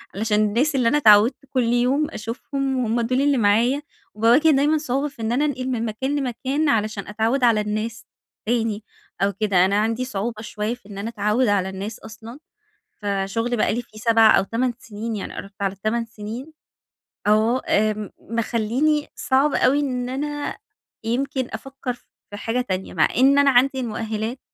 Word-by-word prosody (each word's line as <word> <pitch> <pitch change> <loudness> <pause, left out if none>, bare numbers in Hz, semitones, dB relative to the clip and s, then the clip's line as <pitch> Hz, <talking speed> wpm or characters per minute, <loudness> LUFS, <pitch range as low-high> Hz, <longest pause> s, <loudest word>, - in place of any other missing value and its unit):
علشان 210 0 +1
الناس 255 +8 +1
اللي 250 -3 +2
أنا 295 - +3
أتعودت 220 0 +6
كل 255 -2 +1
يوم 265 +5 +2
أشوفهم 265 +4 -3
وهُم 235 -1 0
دول 255 +3 +1
اللي 285 -2 +3
معايا، 230 +6 +3 0.3
وباواجه 240 +9 +4
دايمًا 295 +2 +3
صعوبة 280 0 -1
في 275 -5 -11
إن 220 +1 -1
أنا 285 +5 +2
أنقل 260 -3 -2
من 235 -2 -1
مكان 260 +6 -2
لمكان 270 +4 -1
علشان 215 -3 0
أتعود 225 +5 0
على 225 -3 +4
الناس 215 +2 -4 0.4
تاني 225 -3 0 0.4
أو 200 0 +2
كده، 195 -3 +2
أنا 200 - +1
عندي 230 +3 -1
صعوبة 215 -1 -4
شوية 215 +1 -3
في 230 -4 -21
إن 200 - -9
أنا 215 +3 -3
أتعود 215 +2 +1
على 195 -2 +1
الناس 195 +3 -6
أصلًا، 225 +4 -11 0.6
فشُغلي 205 +4 -1
بقى 215 - +1
لي 240 - -2
فيه 215 -1 -16
7 225 -1 +5
أو - - +1
8 240 +4 -1
سنين 220 0 -6
يعني 195 - -6
قربت 195 0 -8
على 195 0 -1
8 230 +2 0
سنين، 225 +8 -8 0.8
آه، 220 +4 +3
آمم 215 -1 +1
مخلّيني 235 +6 0
صعب 280 +1 +2
أوي 275 +3 +3
إن 250 -3 -2
أنا 290 +2 -3 0.5
يمكن 260 +3 -1
أفكر 265 +2 -5 0.4
في 205 - -6
حاجة 230 +3 -1
تانية، 190 -6 -4
مع 160 - +3
إن 270 +3 +5
أنا 285 -1 +5
عندي 265 +2 +3
المؤهلات 220 +1 -3
230 Hz, 170 wpm, -22 LUFS, 215-260 Hz, 0.8 s, أتعودت